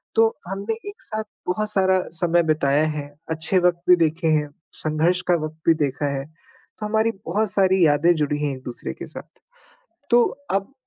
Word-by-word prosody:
तो 225 Hz, 0 st, +6 dB, 0.2 s
हमने 200 Hz, +4 st, -3 dB, 0.2 s
एक 410 Hz, -, -12 dB
साथ 215 Hz, 0 st, -4 dB, 0.2 s
बहुत 210 Hz, +4 st, 0 dB
सारा 190 Hz, -2 st, +3 dB, 0.2 s
समय 170 Hz, 0 st, +2 dB
बिताया 155 Hz, -1 st, +2 dB
है, 150 Hz, -2 st, -4 dB, 0.2 s
अच्छे 160 Hz, +3 st, 0 dB
वक़्त 175 Hz, -1 st, +2 dB
भी 180 Hz, -, +9 dB
देखे 165 Hz, 0 st, 0 dB
हैं, 150 Hz, -2 st, +2 dB, 0.2 s
संघर्ष 160 Hz, +4 st, 0 dB
का 175 Hz, -, +4 dB
वक़्त 155 Hz, 0 st, -8 dB
भी 165 Hz, -, +7 dB
देखा 140 Hz, +2 st, -3 dB
है, 135 Hz, -, -4 dB, 0.5 s
तो 210 Hz, -, -4 dB
हमारी 220 Hz, +1 st, +1 dB
बहुत 205 Hz, +4 st, 0 dB
सारी 190 Hz, -2 st, +4 dB
यादें 150 Hz, +3 st, +4 dB
जुड़ी 150 Hz, -1 st, -1 dB
हैं 140 Hz, -2 st, -1 dB
एक-दूसरे 130 Hz, -2 st, -6 dB
के -, -, -8 dB
साथ। -, -, -11 dB, 0.7 s
तो 240 Hz, 0 st, +6 dB, 0.3 s
अब 195 Hz, +7 st, -1 dB
175 Hz, 175 wpm, -23 LUFS, 155-195 Hz, 0.7 s, भी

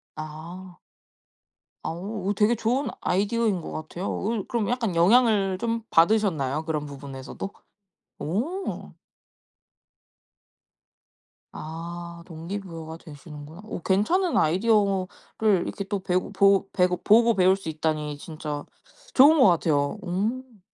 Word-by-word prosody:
아. 165 Hz, +4 st, -8 dB, 1.1 s
아 -, -, -2 dB
어 195 Hz, +4 st, -3 dB
되게 215 Hz, +3 st, +4 dB
좋은 240 Hz, +5 st, 0 dB
아이디어인 205 Hz, +1 st, +1 dB
것 -, -, -7 dB
같아요. 165 Hz, +4 st, -4 dB
그 215 Hz, -1 st, -1 dB
그럼 230 Hz, -3 st, -1 dB
약간 235 Hz, -6 st, -1 dB
영향을 200 Hz, +1 st, +4 dB
좀 230 Hz, +2 st, -2 dB
받으셨나요? 165 Hz, -6 st, +2 dB
그런 155 Hz, -2 st, -2 dB
부분에서도? 140 Hz, +4 st, -7 dB, 0.7 s
오. 275 Hz, -, -3 dB, 2.6 s
아 170 Hz, +2 st, -7 dB
동기부여가 165 Hz, -1 st, -7 dB
되시는구나. 150 Hz, 0 st, -11 dB
오 215 Hz, -, -6 dB
괜찮은 325 Hz, -, +1 dB
아이디어를 195 Hz, +2 st, +2 dB, 0.6 s
이렇게 -, -, -4 dB
또 200 Hz, +1 st, -2 dB
배우고 185 Hz, +1 st, -1 dB
보고 195 Hz, 0 st, +4 dB
배고 180 Hz, -1 st, +2 dB
보고 230 Hz, +2 st, +5 dB
배울 185 Hz, 0 st, +4 dB
수 195 Hz, -4 st, -8 dB
있다니 155 Hz, -2 st, -2 dB
진짜 150 Hz, -2 st, -6 dB, 0.5 s
좋은 290 Hz, +4 st, +7 dB
것 235 Hz, -, +8 dB
같아요. 155 Hz, -1 st, +1 dB
음. 215 Hz, +5 st, -3 dB
185 Hz, 250 characters per minute, -25 LUFS, 160-215 Hz, 2.6 s, 것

